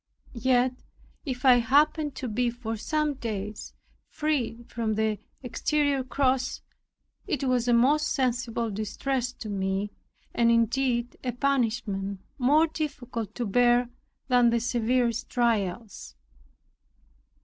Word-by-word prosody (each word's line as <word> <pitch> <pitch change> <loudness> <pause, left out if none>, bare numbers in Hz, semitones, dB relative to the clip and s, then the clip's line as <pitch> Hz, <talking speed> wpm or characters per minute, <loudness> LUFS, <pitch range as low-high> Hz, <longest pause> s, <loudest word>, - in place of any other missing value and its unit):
Yet, 250 +1 +2 0.5
if 255 -2 -4
I 250 -2 +8
happened 295 +4 +2
to 255 - -4
be 240 +2 0
for 235 -1 -5
some 305 +6 -1
days 215 -5 -5 0.3
freed 250 -6 -2
from 225 -2 -1
the 220 -1 0 0.2
exterior 280 +3 0
cross, 260 0 0 0.7
it 305 -7 -1
was 250 -2 +1
a 240 - +4
most 290 +6 +4
sensible 235 -4 -1
distress 245 +5 -2
to 225 - -8
me, 195 0 -2 0.4
and 235 -1 +3
indeed 240 +1 +1
a 250 -2 -2
punishment 225 -7 -1 0.2
more 290 +6 +5
difficult 260 -8 -5
to 245 - -2
bear 240 +3 +3 0.4
than 245 -2 +5
the 235 0 +2
severest 240 0 0
trials. 220 - -1
245 Hz, 115 wpm, -27 LUFS, 225-265 Hz, 0.7 s, I